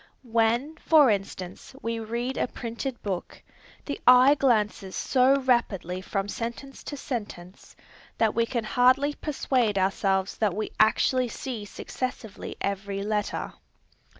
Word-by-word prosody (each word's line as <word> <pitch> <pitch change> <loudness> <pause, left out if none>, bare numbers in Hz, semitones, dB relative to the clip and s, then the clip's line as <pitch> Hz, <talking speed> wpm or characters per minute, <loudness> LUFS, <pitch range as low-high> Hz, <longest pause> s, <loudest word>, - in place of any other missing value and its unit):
When, 235 +6 +1
for 300 -8 +5
instance, 195 +2 -5
we 230 0 -2
read 235 +4 -3
a - - 0
printed 240 +2 -5
book, 190 -4 -5 0.4
the 285 - -5
eye 250 +3 +8
glances 215 -8 +1
so 260 +1 +3
rapidly 195 -8 0
from 195 +1 -2
sentence 235 +6 -6
to 290 - -5
sentence, 205 -9 -7 0.4
that 220 -2 +2
we 230 0 +1
can 235 -2 -2
hardly 255 +6 +3
persuade 255 -8 0
ourselves 190 0 +1
that 210 -5 +1
we 215 +1 -3
actually 250 +4 +3
see 235 -3 -5
successively 225 0 -6
every 200 0 -2
letter. 210 0 -2
230 Hz, 125 wpm, -26 LUFS, 200-255 Hz, 0.4 s, eye